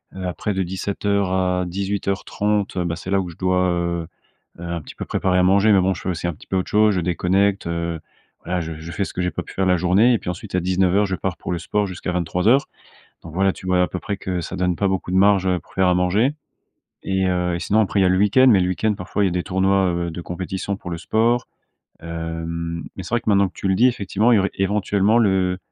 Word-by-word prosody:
heu, 95 Hz, -1 st, -5 dB
après 95 Hz, +3 st, -2 dB
de 95 Hz, 0 st, 0 dB
17:00 100 Hz, +1 st, -1 dB
à 90 Hz, -1 st, +1 dB
18:30 100 Hz, +2 st, -2 dB
heu, 90 Hz, -, +1 dB
bah 85 Hz, -1 st, -2 dB
c'est 95 Hz, -, -8 dB
là 95 Hz, -1 st, +3 dB
où 90 Hz, -, -5 dB
je 80 Hz, -, -12 dB
dois, 90 Hz, -1 st, +1 dB
heu 85 Hz, -1 st, -1 dB, 0.5 s
heu, -, -, -8 dB
un 85 Hz, -1 st, -4 dB
petit -, -, -12 dB
peu -, -, -6 dB
préparer 90 Hz, -1 st, 0 dB
à 90 Hz, -, +4 dB
manger. 100 Hz, +3 st, +4 dB
Mais 100 Hz, -, +5 dB
bon, 95 Hz, +1 st, +2 dB
je -, -, -9 dB
fais 95 Hz, -, -3 dB
aussi 85 Hz, 0 st, -2 dB
un 85 Hz, -, -2 dB
petit -, -, -17 dB
peu 95 Hz, -, -1 dB
autre 90 Hz, -, -2 dB
chose. 105 Hz, -1 st, +4 dB
Je 90 Hz, -, 0 dB
déconnecte, 95 Hz, +2 st, +1 dB
heu, 85 Hz, -1 st, -3 dB, 0.4 s
voilà, 90 Hz, +1 st, -2 dB
je 80 Hz, 0 st, -5 dB
je 85 Hz, +2 st, -8 dB
fais 95 Hz, +3 st, -2 dB
ce -, -, -8 dB
que 90 Hz, -, -3 dB
j'ai 90 Hz, -1 st, 0 dB
pas -, -, -4 dB
pu -, -, -12 dB
faire 95 Hz, -, 0 dB
la 90 Hz, -1 st, +3 dB
journée 95 Hz, +8 st, +4 dB
et -, -, +3 dB
puis -, -, -6 dB
ensuite, 90 Hz, +2 st, -5 dB
à -, -, +3 dB
19:00, 95 Hz, +2 st, +2 dB
je 95 Hz, -1 st, -2 dB
pars 90 Hz, -3 st, -3 dB
pour -, -, -5 dB
le 85 Hz, -, -2 dB
sport 105 Hz, +5 st, -1 dB
jusqu'à 90 Hz, -1 st, -5 dB
23:00. 90 Hz, -, +2 dB, 0.6 s
Donc 80 Hz, -1 st, -10 dB
voilà, 95 Hz, +1 st, +2 dB
tu -, -, -12 dB
vois, 90 Hz, -1 st, +2 dB
à 90 Hz, -, +2 dB
peu 90 Hz, -, -5 dB
près, 100 Hz, -, -3 dB
que 90 Hz, -2 st, -3 dB
ça 90 Hz, -, -6 dB
donne 90 Hz, -1 st, 0 dB
pas 100 Hz, +3 st, 0 dB
beaucoup 95 Hz, -1 st, -2 dB
de -, -, 0 dB
marge, 100 Hz, -1 st, +4 dB
heu, 90 Hz, -1 st, +1 dB
pour -, -, -23 dB
faire 95 Hz, -1 st, +2 dB
à 90 Hz, -, +3 dB
manger 100 Hz, +10 st, +2 dB, 0.7 s
et 95 Hz, -1 st, 0 dB
heu 90 Hz, -1 st, 0 dB
et -, -, -3 dB
sinon 105 Hz, +4 st, +1 dB
après, 100 Hz, -1 st, 0 dB
il -, -, +4 dB
y -, -, +3 dB
a -, -, +4 dB
le 95 Hz, -, +3 dB
week-end, 105 Hz, +7 st, +5 dB
mais 100 Hz, -5 st, +6 dB
le 90 Hz, -, +1 dB
week-end, 105 Hz, +4 st, 0 dB
parfois, 95 Hz, +3 st, -2 dB
il -, -, +3 dB
y -, -, +1 dB
a -, -, -6 dB
des 90 Hz, 0 st, -1 dB
tournois, 95 Hz, 0 st, +2 dB
heu, 85 Hz, -1 st, -2 dB
de 85 Hz, -, -6 dB
compétition 95 Hz, +3 st, -4 dB
pour 90 Hz, -, -8 dB
le 85 Hz, -, -3 dB
sport. 115 Hz, +8 st, +1 dB, 0.5 s
Hem 85 Hz, 0 st, -4 dB
mais 95 Hz, -, -5 dB
c'est -, -, -9 dB
vrai 120 Hz, -, +2 dB
que -, -, -6 dB
maintenant 100 Hz, -1 st, +4 dB
que -, -, -18 dB
tu 95 Hz, -, -3 dB
le 95 Hz, -, +3 dB
dis, 120 Hz, +6 st, +4 dB
effectivement, 110 Hz, 0 st, +1 dB
il -, -, +6 dB
y -, -, +4 dB
aurait 95 Hz, 0 st, +1 dB
éventuellement 100 Hz, +2 st, +2 dB
le 95 Hz, -4 st, +2 dB
95 Hz, 275 wpm, -21 LUFS, 90-100 Hz, 0.7 s, mais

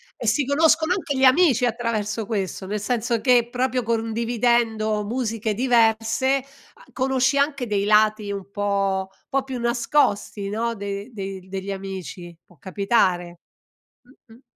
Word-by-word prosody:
E 235 Hz, -, -6 dB
si 250 Hz, +6 st, +2 dB
conoscono 320 Hz, +4 st, +3 dB
anche 330 Hz, -8 st, -3 dB
gli 265 Hz, -, +1 dB
amici 260 Hz, -2 st, +5 dB
attraverso 225 Hz, -2 st, -2 dB
questo, 195 Hz, -3 st, -3 dB
nel 210 Hz, +1 st, -2 dB
senso 235 Hz, +1 st, -1 dB
che 245 Hz, -2 st, +3 dB
proprio 255 Hz, 0 st, 0 dB
condividendo 225 Hz, -1 st, 0 dB
musiche 225 Hz, -1 st, -2 dB
diverse 230 Hz, +1 st, +2 dB
a 275 Hz, -, -14 dB
conosci 265 Hz, +1 st, +1 dB
anche 280 Hz, -3 st, 0 dB
dei 205 Hz, -2 st, -1 dB
lati 215 Hz, -1 st, +3 dB
un 200 Hz, -1 st, -6 dB
po' 195 Hz, -2 st, -1 dB
un -, -, -34 dB
pò 270 Hz, 0 st, 0 dB
più 260 Hz, -2 st, -6 dB
nascosti, 235 Hz, -4 st, 0 dB
no, 230 Hz, +2 st, -2 dB
de 200 Hz, +2 st, -5 dB
de 195 Hz, -3 st, -6 dB
degli 195 Hz, +1 st, -5 dB
amici, 190 Hz, -3 st, -7 dB
può 175 Hz, -, -23 dB
capitare. 185 Hz, -3 st, 0 dB, 0.9 s
Mh-mh. 230 Hz, +3 st, -17 dB
225 Hz, 140 wpm, -23 LUFS, 200-250 Hz, 0.9 s, amici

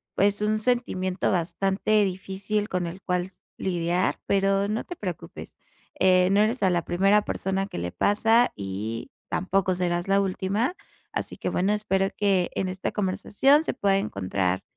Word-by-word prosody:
pues, 205 Hz, +1 st, +2 dB
un 215 Hz, +1 st, +1 dB
sentimiento 195 Hz, -7 st, 0 dB
bastante 195 Hz, +4 st, +1 dB
difícil 195 Hz, +3 st, -3 dB
con 180 Hz, -2 st, -1 dB
el 185 Hz, +3 st, -8 dB
cuales 180 Hz, +1 st, -3 dB, 0.2 s
lidiar, 175 Hz, 0 st, 0 dB
pero 195 Hz, 0 st, +2 dB
no 215 Hz, +2 st, -2 dB
te 355 Hz, -, -7 dB
preocupes, 180 Hz, -, -7 dB, 0.4 s
eh, 185 Hz, -1 st, +5 dB
no 200 Hz, -, +4 dB
eres 225 Hz, +3 st, +1 dB
a 190 Hz, -, +5 dB
la 175 Hz, -2 st, +1 dB
primera 195 Hz, +4 st, +3 dB
persona 195 Hz, +1 st, -2 dB
que -, -, -8 dB
le 90 Hz, +1 st, -3 dB
pasa 225 Hz, -, +3 dB
y 100 Hz, +4 st, -5 dB, 0.2 s
tampoco 190 Hz, 0 st, 0 dB
serás 175 Hz, 0 st, -1 dB
la 195 Hz, +1 st, +3 dB
última. 200 Hz, -, -1 dB, 0.4 s
Así -, -, -4 dB
que -, -, -2 dB
bueno, 190 Hz, +3 st, +1 dB
espero 195 Hz, -2 st, +1 dB
que 195 Hz, -3 st, +2 dB
en 190 Hz, -, -1 dB
esta 185 Hz, 0 st, -3 dB
conversación 210 Hz, +9 st, +2 dB
se -, -, -1 dB
pueda 195 Hz, -1 st, +2 dB
encontrar 95 Hz, -, -1 dB
190 Hz, 160 wpm, -25 LUFS, 180-205 Hz, 0.4 s, eh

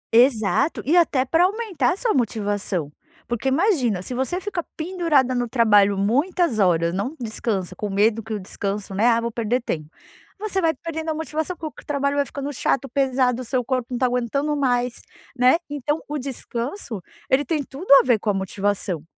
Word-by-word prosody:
Exato. 240 Hz, +4 st, +3 dB
E 315 Hz, -, +3 dB
até 290 Hz, -7 st, +3 dB
pra 330 Hz, +6 st, +3 dB
aumentar 380 Hz, -, 0 dB
a -, -, -7 dB
sua 465 Hz, -1 st, +1 dB
motivação. 205 Hz, -, -1 dB, 0.4 s
Porque 240 Hz, +2 st, -2 dB
imagina, 265 Hz, -, +2 dB
se 255 Hz, -, -5 dB
você 265 Hz, +8 st, -1 dB
fica 375 Hz, -3 st, -3 dB
pendurada 315 Hz, -6 st, +1 dB
no 245 Hz, -2 st, -1 dB
trabalho 205 Hz, -5 st, +4 dB
muitas 270 Hz, -, +1 dB
horas, 170 Hz, -3 st, +3 dB
não 225 Hz, +11 st, -2 dB
descansa, 215 Hz, -5 st, -3 dB
com 210 Hz, -, -4 dB
medo 210 Hz, +3 st, +2 dB
que 225 Hz, 0 st, -10 dB
o 210 Hz, -, -2 dB
descanso, 195 Hz, +1 st, -4 dB
né: 210 Hz, +5 st, +2 dB
"Ah, 230 Hz, -1 st, +4 dB
vou 235 Hz, 0 st, -2 dB
perder 235 Hz, +2 st, -1 dB
tempo", 155 Hz, -9 st, -4 dB, 0.5 s
você 390 Hz, -2 st, -1 dB
vai 330 Hz, -, +3 dB
perdendo 320 Hz, +2 st, -5 dB
a -, -, +1 dB
motivação, 315 Hz, +2 st, -3 dB
porque 315 Hz, -1 st, -7 dB
o -, -, -31 dB
trabalho 280 Hz, 0 st, 0 dB
vai 285 Hz, -, +2 dB
ficando 280 Hz, 0 st, -5 dB
chato, 275 Hz, +2 st, 0 dB
pesado, 255 Hz, -1 st, +1 dB
o -, -, -7 dB
seu 250 Hz, +1 st, 0 dB
corpo 255 Hz, -2 st, -1 dB
não 250 Hz, -, -3 dB
está 255 Hz, -, +2 dB
aguentando 250 Hz, +5 st, 0 dB
mais, 245 Hz, -3 st, 0 dB, 0.3 s
né. 250 Hz, +3 st, +5 dB
Então, 290 Hz, +2 st, -2 dB
o 295 Hz, 0 st, -3 dB
descanso 250 Hz, -, -5 dB, 0.3 s
ele 275 Hz, +2 st, +3 dB
tem 300 Hz, +1 st, -1 dB
tudo 280 Hz, +6 st, -6 dB
a -, -, -7 dB
ver 240 Hz, -4 st, +3 dB
com 210 Hz, -, -2 dB
a -, -, +3 dB
motivação. 190 Hz, -3 st, -2 dB
255 Hz, 190 wpm, -23 LUFS, 220-300 Hz, 0.5 s, né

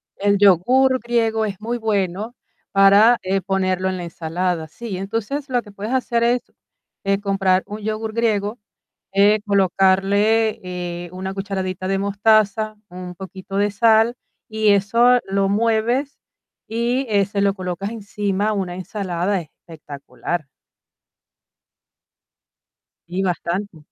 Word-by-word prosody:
El 200 Hz, 0 st, +2 dB
yogur 245 Hz, +8 st, +4 dB
griego 225 Hz, -2 st, 0 dB
es 200 Hz, -3 st, -5 dB
muy 235 Hz, +2 st, -2 dB
bueno 210 Hz, 0 st, -2 dB, 0.4 s
para, 200 Hz, +4 st, +6 dB
eh, 190 Hz, +1 st, 0 dB
ponerlo 185 Hz, 0 st, 0 dB
en 185 Hz, -, -3 dB
la 175 Hz, -, -5 dB
ensalada. 170 Hz, 0 st, -3 dB
Sí, 205 Hz, +4 st, -7 dB
entonces, 225 Hz, +9 st, -4 dB
lo 250 Hz, -1 st, +1 dB
que 205 Hz, -3 st, -14 dB
puedes 205 Hz, +5 st, -5 dB
hacer 240 Hz, -2 st, +1 dB
es, 240 Hz, +1 st, +2 dB, 0.6 s
eh, 195 Hz, 0 st, +1 dB
comprar 195 Hz, -2 st, +1 dB
un 210 Hz, +1 st, -6 dB
yogur 220 Hz, +1 st, -3 dB
griego, 215 Hz, -1 st, 0 dB, 0.6 s
eh, 205 Hz, +2 st, +4 dB
colocarle, 200 Hz, +3 st, +2 dB
eh, 175 Hz, -1 st, -5 dB
una 190 Hz, +1 st, -5 dB
cucharadita 190 Hz, -2 st, -4 dB
de 195 Hz, 0 st, 0 dB
mostaza, 215 Hz, +1 st, +2 dB
un 180 Hz, 0 st, -8 dB
poquito 190 Hz, +1 st, -7 dB
de 205 Hz, +1 st, +2 dB
sal 225 Hz, +2 st, +4 dB, 0.3 s
y 220 Hz, -1 st, +1 dB
eso 230 Hz, +5 st, +4 dB
lo 195 Hz, 0 st, 0 dB
mueves, 230 Hz, +6 st, 0 dB, 0.5 s
y, 240 Hz, +4 st, -1 dB
eh, 200 Hz, -2 st, +3 dB
se 200 Hz, +1 st, -2 dB
lo 200 Hz, 0 st, +2 dB
colocas 185 Hz, +1 st, -4 dB
encima 205 Hz, -2 st, -2 dB
a -, -, 0 dB
una 185 Hz, -3 st, -3 dB
ensalada 185 Hz, 0 st, -2 dB
espectacular. 150 Hz, -2 st, -7 dB, 2.6 s
Sí, 180 Hz, +3 st, -3 dB
bastante. 180 Hz, 0 st, -2 dB
200 Hz, 130 wpm, -21 LUFS, 185-220 Hz, 2.6 s, para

